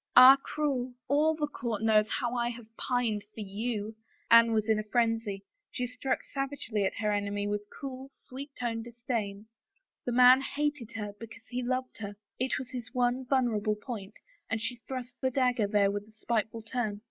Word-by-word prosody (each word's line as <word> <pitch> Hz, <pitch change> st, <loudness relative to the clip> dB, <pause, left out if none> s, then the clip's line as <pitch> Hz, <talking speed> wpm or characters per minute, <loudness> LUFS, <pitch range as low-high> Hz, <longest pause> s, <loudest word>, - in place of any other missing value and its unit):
"Ah, 255 Hz, +2 st, +11 dB
cruel! 260 Hz, -5 st, -2 dB
All 300 Hz, +4 st, +3 dB
the 305 Hz, -1 st, 0 dB
court 235 Hz, -7 st, -3 dB
knows 215 Hz, -1 st, +4 dB
how 240 Hz, -3 st, -1 dB
I 240 Hz, -1 st, +1 dB
have 230 Hz, -2 st, -10 dB
pined 235 Hz, -5 st, 0 dB
for 220 Hz, -, -5 dB
you! 215 Hz, +1 st, -3 dB, 0.2 s
" -, -, -22 dB
Anne 230 Hz, 0 st, +8 dB
was 215 Hz, -1 st, +1 dB
in 220 Hz, -1 st, +3 dB
a -, -, -2 dB
frenzy; 225 Hz, -3 st, 0 dB, 0.3 s
she 250 Hz, -, -2 dB
struck 250 Hz, +2 st, -2 dB
savagely 275 Hz, -7 st, -2 dB
at 190 Hz, -, -1 dB
her 210 Hz, -1 st, 0 dB
enemy 205 Hz, 0 st, -1 dB
with 205 Hz, 0 st, -1 dB
her 205 Hz, -, -19 dB
cool, 265 Hz, -1 st, -6 dB
sweet 275 Hz, +3 st, -8 dB
toned 230 Hz, -2 st, -2 dB
disdain. 230 Hz, -4 st, -3 dB, 0.6 s
The 245 Hz, -, -1 dB
man 250 Hz, +2 st, +8 dB
hated 285 Hz, -4 st, -2 dB
her 210 Hz, -2 st, -4 dB
because 230 Hz, 0 st, -11 dB
he 250 Hz, 0 st, -2 dB
loved 255 Hz, +1 st, -2 dB
her; 205 Hz, -1 st, -5 dB, 0.2 s
it 255 Hz, +1 st, +1 dB
was 255 Hz, -1 st, -6 dB
his 245 Hz, -2 st, -6 dB
one 250 Hz, +1 st, +1 dB
vulnerable 230 Hz, -6 st, +2 dB
point 210 Hz, -2 st, -7 dB, 0.3 s
and 225 Hz, -, 0 dB
she 240 Hz, +2 st, -3 dB
thrust 250 Hz, -2 st, -5 dB
her 260 Hz, -, +2 dB
dagger 250 Hz, -4 st, +2 dB
there 200 Hz, -1 st, +3 dB
with 205 Hz, +1 st, -4 dB
a -, -, -18 dB
spiteful 220 Hz, 0 st, -2 dB
turn. 220 Hz, -3 st, -2 dB
235 Hz, 190 wpm, -30 LUFS, 215-255 Hz, 0.6 s, Ah